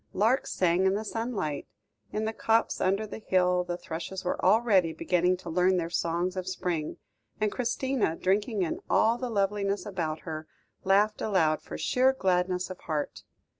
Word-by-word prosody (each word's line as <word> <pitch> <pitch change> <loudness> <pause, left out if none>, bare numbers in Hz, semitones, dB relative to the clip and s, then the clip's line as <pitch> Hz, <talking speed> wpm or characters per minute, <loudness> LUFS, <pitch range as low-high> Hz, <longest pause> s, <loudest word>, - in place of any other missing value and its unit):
Larks 225 +7 +2
sang 180 +1 +2
in 190 - +2
the 215 +2 -3
sunlight; 215 - -3 0.4
in 215 +1 -2
the 220 - -2
copse 225 +1 +1
under 195 +3 +1
the 215 - -8
hill 180 -3 +2
the 175 0 -4
thrushes 175 +2 -6
were 180 - -2
already 200 -7 +4
beginning 180 +2 +1
to 180 -1 -9
learn 180 +2 +3
their 170 -1 -2
songs 175 +2 -1
of 185 -1 -4
spring; 175 -4 -2 0.4
and 215 -1 +1
Christina, 250 -5 0
drinking 205 +3 0
in 165 - -2
all 230 +2 +3
the 250 -1 -3
loveliness 200 -2 0
about 165 -6 -3
her, 155 -1 -6 0.4
laughed 205 +3 +3
aloud 165 -7 +2
for - - -7
sheer 260 +1 +3
gladness 180 -4 0
of 185 - -8
heart. 155 -3 -3
185 Hz, 170 wpm, -28 LUFS, 175-215 Hz, 0.4 s, already